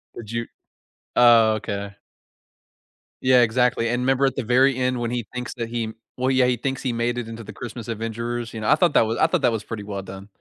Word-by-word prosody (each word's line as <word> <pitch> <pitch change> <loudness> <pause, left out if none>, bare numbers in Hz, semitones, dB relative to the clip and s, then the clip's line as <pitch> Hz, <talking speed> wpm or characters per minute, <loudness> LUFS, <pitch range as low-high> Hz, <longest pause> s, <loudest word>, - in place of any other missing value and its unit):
Did 110 -1 -8
you 115 0 -3 0.7
oh, 115 -2 +6
okay. 100 -2 -5 1.3
Yeah, 130 -1 +6
exactly, 120 0 +2
and 120 +1 0
'member 135 +1 +2
at 135 - 0
the 135 - -2
very 130 +3 +3
end 125 -1 0
when 120 0 -2
he 120 -4 -3
thinks 125 0 -5
that 115 -2 -4
he 115 -2 -3 0.2
well, 130 +1 0
yeah, 130 -1 +4
he 125 -1 +1
thinks 135 +2 -3
he 130 - -1
made 120 +1 -1
it 115 - -5
into 115 0 -8
the 105 - -10
Christmas 120 +1 -8
Adventurers, 115 +1 -4
you 110 - -5
know? 110 - -3
I 150 - +7
thought 170 -1 +2
that 115 - +5
was 115 +1 -2
I - - +5
thought - - 0
that 120 - +4
was 110 -2 -3
pretty 105 -2 -6
well 100 -1 -5
done. 95 +1 -10
115 Hz, 235 wpm, -23 LUFS, 110-125 Hz, 1.3 s, I